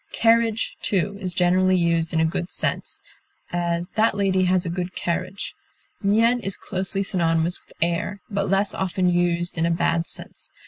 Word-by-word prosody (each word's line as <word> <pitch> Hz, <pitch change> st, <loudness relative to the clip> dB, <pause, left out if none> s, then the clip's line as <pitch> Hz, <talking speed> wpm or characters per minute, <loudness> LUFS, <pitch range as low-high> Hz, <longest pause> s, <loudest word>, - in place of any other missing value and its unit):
Carriage, 230 Hz, -1 st, +2 dB
too, 200 Hz, 0 st, 0 dB
is 185 Hz, -2 st, -2 dB
generally 185 Hz, +1 st, +3 dB
used 170 Hz, -1 st, +1 dB
in 160 Hz, -, +1 dB
a 160 Hz, -, +4 dB
good 170 Hz, +2 st, -2 dB
sense; -, -, -2 dB, 0.5 s
as, 175 Hz, 0 st, -1 dB
that 220 Hz, +1 st, +2 dB
lady 190 Hz, -2 st, +2 dB
has 185 Hz, 0 st, +2 dB
a -, -, -2 dB
good 180 Hz, +1 st, -4 dB
carriage. 185 Hz, +3 st, -3 dB, 0.5 s
Mien 225 Hz, +4 st, +3 dB
is 195 Hz, -4 st, -3 dB
closely 190 Hz, +1 st, -2 dB
synonymous 170 Hz, -2 st, 0 dB
with -, -, -26 dB
air, 170 Hz, +4 st, -1 dB
but 200 Hz, -2 st, -2 dB
less 195 Hz, +1 st, +2 dB
often 185 Hz, -1 st, 0 dB
used 175 Hz, -1 st, 0 dB
in 165 Hz, -, +2 dB
a -, -, +1 dB
bad 170 Hz, 0 st, +1 dB
sense. -, -, -7 dB
185 Hz, 170 wpm, -23 LUFS, 170-195 Hz, 0.5 s, a